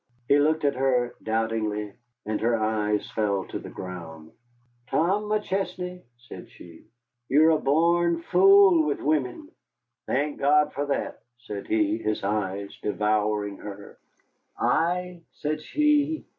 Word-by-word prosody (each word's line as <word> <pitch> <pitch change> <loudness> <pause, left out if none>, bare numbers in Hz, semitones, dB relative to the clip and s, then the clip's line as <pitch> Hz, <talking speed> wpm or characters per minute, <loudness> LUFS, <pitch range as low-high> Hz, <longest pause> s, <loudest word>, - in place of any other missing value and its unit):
He 145 - +5
looked 155 +1 +2
at 140 - +3
her 125 -2 +1
doubtingly, 110 -2 -2 0.3
and 110 0 -2
her 115 +1 +2
eyes 105 -1 -1
fell 100 -3 -1
to - - -4
the - - -9
ground. 80 -4 -9 0.6
"Tom 195 +6 +1
McChesney," 190 -3 -3 0.2
said 120 0 -12
she, 85 -2 -15 0.4
"you're 155 +4 +5
a 155 - +2
born 170 +3 +2
fool 190 -3 +6
with 145 - -1
wimmen." 155 - -1 0.6
"Thank 145 +2 -1
God 150 +1 +3
for 145 +1 -3
that," 140 - -3 0.2
said 105 -5 -8
he, 110 0 +1
his 110 -2 -2
eyes 100 -1 -2
devouring 105 -1 0
her. 100 -1 -10 0.6
"Ay," 180 +1 0
said 155 +1 -3
she. 300 - +1
135 Hz, 130 wpm, -25 LUFS, 105-170 Hz, 0.6 s, fool